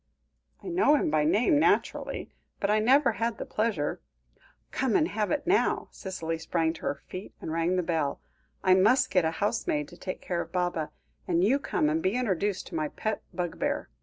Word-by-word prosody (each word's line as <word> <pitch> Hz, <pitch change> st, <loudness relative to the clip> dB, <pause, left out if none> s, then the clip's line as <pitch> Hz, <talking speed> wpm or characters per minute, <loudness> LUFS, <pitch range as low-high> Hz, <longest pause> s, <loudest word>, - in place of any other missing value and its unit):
"I -, -, -8 dB
know 345 Hz, -4 st, +4 dB
him 280 Hz, -, +1 dB
by 150 Hz, -1 st, +2 dB
name, 220 Hz, -, +3 dB
naturally; -, -, 0 dB, 0.3 s
but 200 Hz, -, +1 dB
I 215 Hz, -, +4 dB
never 265 Hz, +6 st, +4 dB
had 230 Hz, 0 st, -2 dB
the -, -, -5 dB
pleasure 215 Hz, -10 st, -1 dB, 0.3 s
" -, -, -35 dB, 0.3 s
"Come 255 Hz, -4 st, 0 dB
and 310 Hz, -, +4 dB
have 215 Hz, -1 st, -1 dB
it 295 Hz, -1 st, -1 dB
now." 370 Hz, +4 st, +2 dB
Cicely 165 Hz, -4 st, -4 dB
sprang 165 Hz, 0 st, 0 dB
to -, -, -12 dB
her 140 Hz, -, -3 dB
feet, 185 Hz, +2 st, -8 dB
and -, -, -5 dB
rang 165 Hz, +3 st, +1 dB
the 180 Hz, -, +1 dB
bell. 160 Hz, -4 st, -1 dB, 0.4 s
"I 185 Hz, -, +5 dB
must 250 Hz, +8 st, +4 dB
get 180 Hz, -3 st, +3 dB
a -, -, +3 dB
housemaid 165 Hz, -5 st, -1 dB
to 175 Hz, -, -13 dB
take 185 Hz, -, -5 dB
care 175 Hz, -2 st, -2 dB
of -, -, -8 dB
Baba; 175 Hz, -4 st, -1 dB, 0.4 s
and 175 Hz, 0 st, +2 dB
you 255 Hz, +8 st, +3 dB
come 155 Hz, -, 0 dB
and 155 Hz, +2 st, +1 dB
be 190 Hz, +6 st, +1 dB
introduced 205 Hz, -5 st, 0 dB
to -, -, -7 dB
my 155 Hz, -1 st, 0 dB
pet 215 Hz, +8 st, -3 dB
bugbear. 175 Hz, -2 st, -2 dB
185 Hz, 200 wpm, -28 LUFS, 165-230 Hz, 0.4 s, I